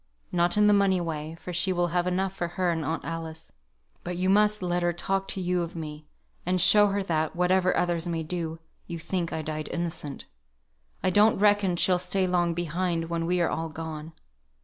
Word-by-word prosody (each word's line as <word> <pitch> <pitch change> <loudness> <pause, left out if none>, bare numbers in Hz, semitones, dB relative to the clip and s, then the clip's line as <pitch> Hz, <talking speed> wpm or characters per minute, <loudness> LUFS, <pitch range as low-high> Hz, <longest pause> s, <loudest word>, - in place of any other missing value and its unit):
Not 175 +1 +2
in 210 - +5
the 210 - +6
money 195 -2 +3
way, 160 -2 -4
for 180 - -7
she 175 +3 +2
will 175 -1 +1
have 175 +1 0
enough 185 +1 0
for 175 -2 -3
her 175 +1 0
and 165 -1 -2
Aunt 160 +2 -3
Alice; 165 -1 -6 0.5
but 175 0 -4
you 185 +1 +2
must 210 0 +3
let 175 0 0
her 175 0 +2
talk 195 +3 -2
to - - -3
you 180 -1 0
of 170 0 -5
me; 155 -2 -7 0.4
and 180 +1 0
show 205 +4 +7
her 200 0 -1
that 160 -4 -1
(whatever 180 +1 +2
others 175 -1 0
may 165 -1 -2
do) 165 0 -4 0.3
you 170 - -5
think 170 +1 -3
I 160 - -3
died 155 0 -4
innocent. 165 -5 -4 0.8
I 185 - +2
don't 210 +3 +5
reckon 205 -3 +3
she 185 - +3
will 180 - +3
stay 190 +1 0
long 175 -2 +1
behind 170 0 -2
when 165 0 -1
we 180 0 +1
are 170 - +2
all 165 0 -2
gone. 160 0 -7
175 Hz, 210 wpm, -27 LUFS, 165-185 Hz, 0.8 s, show